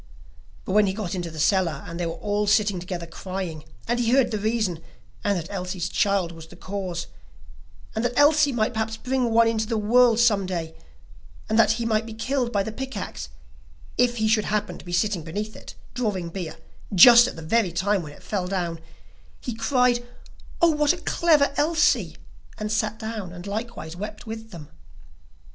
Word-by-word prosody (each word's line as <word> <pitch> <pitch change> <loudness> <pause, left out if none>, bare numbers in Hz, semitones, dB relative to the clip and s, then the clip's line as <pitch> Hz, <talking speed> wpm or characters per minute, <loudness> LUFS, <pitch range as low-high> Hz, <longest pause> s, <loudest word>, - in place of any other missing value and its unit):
But - - -4
when 210 +1 +4
he 190 - 0
got 205 -5 -4
into 175 -3 -3
the 160 - -10
cellar, 165 -2 +1
and 170 +1 -7
they 175 - -1
were 165 - -3
all 205 0 -1
sitting 205 -3 +3
together 175 -1 -5
crying, 180 -2 -6 0.2
and 240 - 0
he 235 -1 +1
heard 255 0 +3
the 215 - -1
reason, 215 -6 -1 0.4
and 200 -2 +1
that 170 +3 -6
Elsie's 180 -2 -3
child 195 -4 +1
was 165 -1 -11
the - - -14
cause, 185 -3 -4 0.9
and 220 - -1
the 245 0 -1
Elsie 290 0 +5
might 235 -2 0
perhaps 220 0 -2
bring 255 0 0
one 230 0 +4
into 220 -1 0
the 225 -1 -1
world 230 +2 +4
some 210 -5 +3
day, 165 -3 -4 0.7
and 220 +1 +1
that 220 - +5
he 230 +1 -3
might 220 0 0
be 225 - -8
killed 245 +1 -1
by 200 -3 +1
the 220 - -5
pick 265 +4 -6
axe, - - -6 0.7
if 245 -1 +2
he 220 0 +1
should 215 -1 +2
happen 210 -4 -2
to - - -14
be 175 - -7
sitting 175 +1 +1
beneath 205 +7 -5
it, - - -11 0.2
drawing 205 -8 -2
beer 170 -3 -5 0.4
just 240 +6 +9
at - - -6
the 165 - -9
very 195 +3 +1
time 190 +3 +1
when 150 -3 -8
it - - -17
fell 190 -4 -2
down, 175 -3 -2 0.6
he 245 - -5
cried: 240 +1 +2 0.6
'Oh, 340 - +7
what 300 +1 +3
a - - -6
clever 315 -5 +2
Elsie!' 295 - +2 0.4
and 215 0 -3
sat 215 0 0
down, 220 -5 -5
and 175 +1 -9
likewise 205 -5 -5
wept 205 +6 -7
with 225 0 -7
them. 160 -7 -10
210 Hz, 195 wpm, -24 LUFS, 180-235 Hz, 0.9 s, just